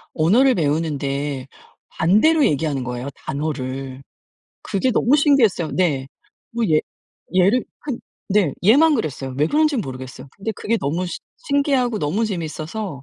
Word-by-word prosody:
언어를 240 +12 +4
배우는데 145 -4 -1 0.4
반대로 220 - +3
얘기하는 145 -2 0
거예요, 125 +2 -4
단어를. 135 -2 -4 0.6
그게 200 +7 0
너무 250 +3 +3
신기했어요. 255 - +3
네. 145 -8 0 0.4
뭐 235 0 -1
얘 155 0 +4 0.6
얘를 200 +8 +4 0.2
한 270 -5 -4 0.3
네. 195 -7 +2
얘만 295 - +6
그랬어요. 135 - -3
왜 150 - +3
그런지 305 - +2
모르겠어요. 130 - -6
근데 215 +3 -3
그게 230 +2 -1
너무 165 +4 -2
시 175 - -5 0.3
신기하고 275 -5 +1
너무 190 +8 0
재밌어서 165 -3 -5
175 Hz, 315 characters per minute, -21 LUFS, 140-235 Hz, 0.6 s, 얘만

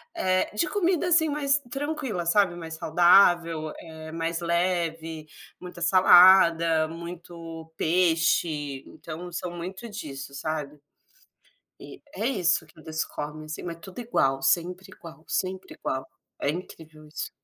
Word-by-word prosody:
eh, 185 - +1
de 340 - +2
comida 360 -3 0
assim 320 -2 +5
mais 280 -1 +3
tranquila, 275 - -3
sabe, 180 0 +3
mais 165 -2 -7
saudável, 170 -1 +3
eh 160 -1 -10
mais 165 +1 -2
leve, 170 -2 -2 0.3
muita 180 -1 -10
salada, 170 -2 +6
muito 165 -1 -9
peixe, 160 -4 +1
então 175 +3 -9
são 175 +1 -4
muito 185 +6 -7
disso, 140 -10 -7
sabe. 150 0 -4 1.0
E - - -12
é 225 - -2
isso 175 -9 +2
que 150 - -20
eles 160 +1 -3
comem 150 +1 -7
assim 155 - -7
mas 170 -1 -6
tudo 190 +5 -10
igual, 135 - +1
sempre 180 +6 +1
igual, 165 -1 -13
sempre 185 0 -3
igual. 130 0 -4 0.3
É 140 - -1
incrível 155 -3 -10
isso. 150 - -5
170 Hz, 130 wpm, -26 LUFS, 160-185 Hz, 1.0 s, salada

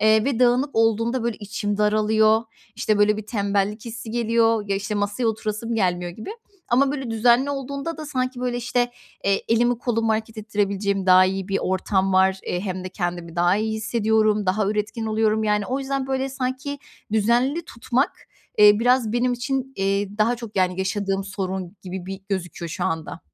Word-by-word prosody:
Eee, 215 0 +4
ve 270 -4 0
dağınık 250 +3 +3
olduğunda 225 +2 +2
böyle 235 -2 -1
içim 205 0 -3
daralıyor, 215 +1 +3 0.3
işte, 215 -1 0
böyle 210 0 +4
bir 215 - -7
tembellik 205 0 -1
hissi 235 -1 -7
geliyor, 230 -1 +2
ya, 195 - +1
işte, 210 +2 -3
masaya 205 +3 -1
oturasım 220 +1 -2
gelmiyor 180 -4 0
gibi. 215 - -8 0.4
Ama 270 +3 +3
böyle 265 -5 -4
düzenli 240 +4 +3
olduğunda 280 +3 -4
da 310 -1 -7
sanki 255 -2 -2
böyle, 245 -1 -1
işte, 245 0 0 0.3
eee, 195 0 +2
elimi 240 +1 +2
kolumu 230 -2 0
hareket 220 +1 -3
ettirebileceğim 200 -2 -1
daha 185 0 +7
iyi 190 +1 -2
bir 195 - +1
ortam 190 +1 0
var. 190 0 +4
Eee, 180 - -1
hem 185 -2 -4
de - - -4
kendimi 175 -2 -4
daha 175 +3 +3
iyi 220 +1 -1
hissediyorum, 215 -2 +1
daha 195 +2 +1
üretken 210 +2 -2
oluyorum. 220 0 +1
Yani, 210 -1 +1
o 260 +2 -1
yüzden 270 -1 -2
böyle 265 0 -1
sanki 265 +2 -3 0.3
düzenli 240 +9 +2
tutmak, 245 +3 -1 0.5
eee, 210 0 +9
biraz 245 -2 +3
benim 245 +1 +1
için, 265 +2 -2
eee, 200 +1 -1
daha 235 +3 +3
çok, 225 -3 -9
yani, 185 0 +1
yaşadığım 195 0 -1
sorun 190 -1 -4
gibi 185 -1 -6
bir 195 0 -6
gözüküyor 180 -2 -4
şu - - -3
anda. 160 -1 -3
215 Hz, 175 wpm, -23 LUFS, 195-240 Hz, 0.5 s, eee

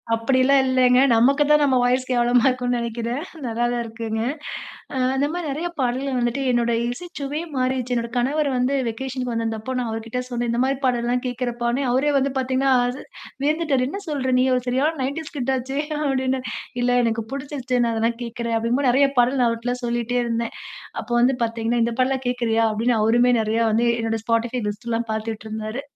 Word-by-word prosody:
அப்படி 230 +4 +1
எல்லாம் 275 0 +5
இல்லைங்க. 255 -1 +4
நமக்குத்தான் 285 +5 +4
நம்ம 265 -3 +3
வாய்ஸ் 255 +1 +2
கேவலமா 240 0 +3
இருக்கும்ன்னு 250 -1 0
நெனைக்கிறேன். 235 +4 -3 0.2
நல்லாதான்ருக்குங்க. 230 -1 -2 0.7
அ - - -1 0.2
அந்த 280 +2 +2
மாரி 350 -2 -3
நெறைய 315 +6 -2
பாடல்கள் 260 +1 0
வந்துட்டு 240 +3 0
என்னோட 235 -1 +1 0.2
இசைச்சுவையே 300 +1 -5
மாறிடுச்சு. 255 -1 0
என்னுடைய 235 0 -3
கணவர் 280 +4 +1
வந்து 250 +3 +1 0.2
வெகேஷனுக்கு 255 +1 -4
வந்திருந்தப்போ 225 +2 -3
நான் 240 -2 -2
அவர்கிட்ட 225 +2 -4
சொன்னேன். 240 -1 -2
இந்த 235 - 0
மாரி 270 0 0
பாடல்லாம் 245 0 +1
கேட்கிறப்பான்னேன், 245 +1 -1
அவரே 280 +4 +2
வந்து 275 0 +1
பாத்தீங்கன்னா, 260 +1 +1 0.2
அச 250 +2 -3 0.5
வியந்துட்டாரு. 295 -4 +1
"என்ன 400 - -5
சொல்ற? 265 -4 -1
நீ 255 - +4
ஒரு 250 - -1
சரியான 275 +6 +1
90ஸ் 285 +4 -4
கிட் 265 +1 0
ஆச்சே" 270 +3 -3 0.2
அப்டின்னு. 265 -2 0 0.4
"இல்லை, 245 0 +2
எனக்குப் 225 -1 -1
புடிச்சிருச்சுனால 250 -5 -1
தான் 235 0 -3
கேக்கிறேன்" 235 0 -3
அப்படிங்கும்போது 245 +4 +1
நெறைய 275 +2 +4
பாடல் 255 +2 +3
நான் 235 - +4
அவர்ட்டலாம் 245 +2 -3
சொல்லிட்டே 240 +1 -1
இருந்தேன். 230 0 -2 0.5
அப்போ 240 - -11
வந்து 255 +1 +4
பாத்தீங்கன்னா, 230 +1 -1
"இந்த 235 - -2
பாட்டெல்லாம் 260 0 0
கேக்கிறயா?" 230 -2 +1
அப்டின்னு 225 +1 +1
அவருமே 240 +3 +4
நெறையா 220 +2 +1
வந்து 235 +2 +2
என்னுடைய 225 -1 -2
Spotify 230 +2 0
லிஸ்ட் 210 +3 -5
எல்லாம் 230 0 -1
பாத்துட்ருந்தாரு. 220 +2 -4
245 Hz, 165 wpm, -22 LUFS, 230-265 Hz, 0.7 s, எல்லாம்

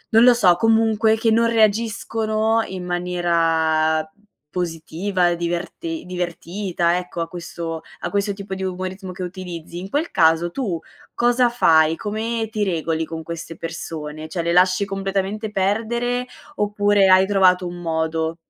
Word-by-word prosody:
non 225 - +8
lo 250 0 +8
so, 190 -7 +4
comunque, 220 +1 +3
che 225 +1 +1
non 230 +1 +4
reagiscono 220 0 +1
in 185 -1 -6
maniera 165 -3 +1 0.4
positiva, 175 +2 -1
diverte 175 - -4
divertita, 175 0 -2
ecco, 180 -1 -6
a 165 - -1
questo 170 -1 -6 0.2
a 175 - -3
questo 200 +2 0
tipo 195 -1 -7
di 190 0 -4
umorismo 185 +1 -4
che 185 +1 -6
utilizzi. 175 -2 -7
In 190 +2 -7
quel 300 +8 -1
caso, 165 +1 +3
tu 190 -8 -2 0.3
cosa 245 +1 +3
fai? 160 -9 +4
Come 225 +2 -2
ti 215 -1 -1
regoli 165 -4 -1
con 160 0 -6
queste 165 0 -7
persone? 155 -2 -6
Cioè, 175 - -2
le 170 +1 0
lasci 185 +2 +4
completamente 195 +2 -2
perdere 230 +5 0 0.3
oppure 205 -2 +3
hai 185 0 +7
trovato 185 -2 +3
un 175 0 -7
modo? 160 0 -1
185 Hz, 145 wpm, -21 LUFS, 170-215 Hz, 0.4 s, non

